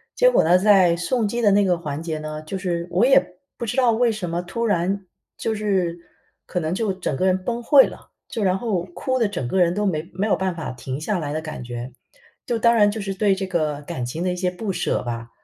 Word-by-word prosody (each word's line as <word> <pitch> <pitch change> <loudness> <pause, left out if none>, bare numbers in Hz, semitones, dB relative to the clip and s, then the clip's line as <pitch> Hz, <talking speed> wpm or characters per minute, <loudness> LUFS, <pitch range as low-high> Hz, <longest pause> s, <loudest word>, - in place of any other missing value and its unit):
结 - - +5
果 - - +4
呢， 175 +3 +5
在 190 -3 +5
送 210 +6 0
机 235 +3 -2
的 205 -3 +4
那 200 0 +4
个 180 -2 +2
环 150 -2 -4
节 160 -2 -4
呢， 155 0 -6
就 190 +5 -5
是 175 -2 -2
我 190 +7 +3
也 180 -9 +3 0.2
不 235 - -4
知 240 +3 -3
道 250 -3 +4
为 235 +1 +2
什 195 -6 -4
么 170 +1 -1
突 230 +6 -3
然 190 0 0 0.3
就 220 -1 -2
是 190 -5 0 0.5
可 180 - -2
能 160 +1 -2
就 205 -2 0
整 185 -7 -3
个 185 - 0
人 185 0 +1
崩溃 240 +5 +4
了， - - -13 0.2
就 220 - -3
然 185 0 +2
后 195 -6 -1
哭 260 +8 -2
得 225 - +3
整 130 -10 -4
个 190 - 0
人 175 -1 +4
都 210 +1 -1
没 160 -3 -1
没 200 +4 -1
有 - - +3
办 190 -2 -1
法 160 - -5
停 130 +3 -6
下 205 +3 -1
来 145 -2 -3
的 155 - -2
感 155 -5 -7
觉， 120 +1 -6 0.5
就 235 -2 -1
当 235 +1 +4
然 205 -2 +5
就 220 0 -5
是 195 -1 -3
对 200 -1 +3
这 190 0 -4
个 155 -5 -1
感 145 -5 -5
情 160 +8 -4
的 180 - 0
一 - - -2
些 180 0 0
不 195 +2 -4
舍 175 - -1
吧。 115 -1 -5
185 Hz, 275 characters per minute, -22 LUFS, 170-210 Hz, 0.5 s, 结